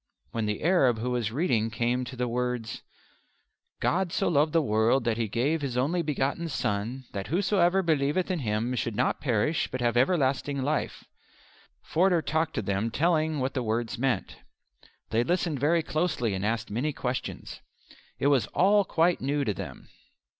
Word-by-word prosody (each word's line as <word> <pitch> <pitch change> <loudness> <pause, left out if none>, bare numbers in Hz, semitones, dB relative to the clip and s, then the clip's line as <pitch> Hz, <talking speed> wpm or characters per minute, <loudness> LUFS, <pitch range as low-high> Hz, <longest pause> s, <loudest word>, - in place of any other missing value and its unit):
When 115 -2 -2
the 105 -1 -3
Arab 150 -9 +4
who 120 +3 -2
was 120 -3 -1
reading 120 -6 +1
came 120 +3 -1
to 130 - -8
the 125 0 -1
words: 120 -2 -2 1.0
"God 185 0 0
so 195 - +1
loved 150 -1 +3
the 165 - +4
world 115 -1 +2
that 115 -2 0
He 115 - 0
gave 140 +9 0
His 130 -4 -3
only 155 +8 +1
begotten 150 +2 -1
Son, 120 0 -2
that 100 -1 -5
whosoever 190 +1 +2
believeth 160 +3 +1
in 180 - -1
Him 115 0 -1
should 115 -3 -2
not 125 - 0
perish, 130 +4 0
but 130 - -4
have 120 -1 +1
everlasting 135 -1 +1
life," 150 +2 -2 0.8
Forder 175 -1 +2
talked 160 0 -1
to 110 - -1
them 100 +3 -1
telling 155 +3 +1
what 130 +1 -1
the 130 - -1
words 115 +1 -2
meant. 135 -1 -1 0.7
They 115 +1 +2
listened 170 0 0
very 160 +4 +2
closely 155 - -1
and 95 0 -3
asked 110 +1 -1
many 135 +8 -1
questions. 125 -1 -4 0.6
It - - -3
was 140 -6 +3
all 200 +3 +5
quite 170 -1 +1
new 140 +2 0
to 105 - 0
them. - - -8
130 Hz, 170 wpm, -27 LUFS, 115-160 Hz, 1.0 s, all